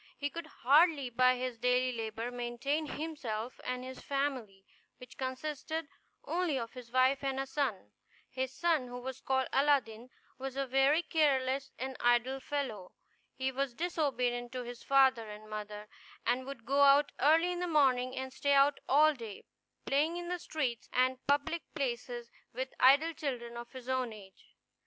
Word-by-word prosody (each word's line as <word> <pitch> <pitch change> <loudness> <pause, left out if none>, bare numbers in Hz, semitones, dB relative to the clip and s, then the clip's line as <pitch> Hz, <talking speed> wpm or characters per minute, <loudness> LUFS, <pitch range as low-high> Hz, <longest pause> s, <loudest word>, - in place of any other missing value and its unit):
He 285 0 -2
could 335 +1 -6 0.2
hardly, 285 -1 +5
by 255 +1 +4
his 250 -2 -4
daily 250 +1 +2
labor, 225 +1 -4
maintain 245 +6 -2
himself 255 -8 -5
and 250 0 -3
his 260 0 -8
family, 255 -9 -3 0.3
which 250 0 -13
consisted 295 +4 -4 0.4
only 345 -5 0
of 230 -2 -5
his 250 -2 -11
wife 260 +2 +3
and 270 -1 -1
a 270 - -1
son. 265 - -2 0.4
His 260 0 -3
son, 315 -2 +1
who 245 0 -7
was 260 +1 -6
called 265 -1 +1
Aladdin, 255 -5 +2 0.3
was 265 0 -5
a 275 0 -1
very 270 +5 +3
careless 275 -4 +1
and 265 0 -5
idle 240 +2 +2
fellow. 260 -9 -4 0.4
He 265 0 -1
was 265 -2 -2
disobedient 250 -8 -1
to 255 -1 -3
his 240 0 -8
father 265 -5 +4
and 210 +1 -10
mother, 210 0 -6 0.4
and 255 +2 0
would 275 -5 -8
go 280 +1 +2
out 280 +1 +6
early 325 +5 +4
in 355 - -3
the 360 - -1
morning 260 -5 +3
and 260 0 -5
stay 285 +1 +1
out 280 +1 +4
all 305 +3 +6
day, 225 -7 -9 0.4
playing 305 +5 +1
in 350 0 -5
the 360 0 -2
streets 265 -9 -3
and 255 +1 +2
public 290 +4 +1
places 240 -4 -3 0.2
with 260 +2 -4
idle 285 +6 +6
children 245 -6 -4
of 235 0 -8
his 255 -2 -10
own 255 -3 -1
age. 195 -3 -15
260 Hz, 165 wpm, -32 LUFS, 245-285 Hz, 0.4 s, out